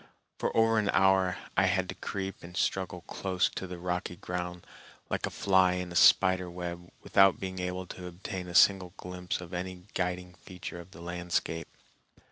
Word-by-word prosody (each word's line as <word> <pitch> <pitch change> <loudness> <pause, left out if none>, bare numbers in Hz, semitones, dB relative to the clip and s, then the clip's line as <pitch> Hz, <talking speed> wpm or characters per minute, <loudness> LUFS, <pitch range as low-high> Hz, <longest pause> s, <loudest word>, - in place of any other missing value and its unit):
For - - -1
over 115 0 +5
an 105 -2 0
hour 95 -1 +4 0.2
I 95 0 +4
had 95 0 +1
to - - -2
creep 95 -1 -5
and 90 +2 -9
struggle 95 -3 -1
close 95 0 0
to 95 - -5
the 90 0 -6
rocky 90 0 -3
ground 90 0 -5 0.5
like - - 0
a - - -3
fly 95 -2 +3
in 90 -1 -3
a - - -7
spider 95 0 +5
web 85 0 -6
without 95 -1 +5
being 95 -1 -4
able 90 0 -3
to 90 0 -8
obtain 90 +1 -6
a 85 - -7
single 95 -2 +5
glimpse 90 0 -4
of 90 +1 -10
any 90 0 -4
guiding 90 0 -2
feature 90 -1 -8
of 85 +1 -11
the 95 - -13
landscape. 85 -1 -2
90 Hz, 180 wpm, -30 LUFS, 90-95 Hz, 0.5 s, over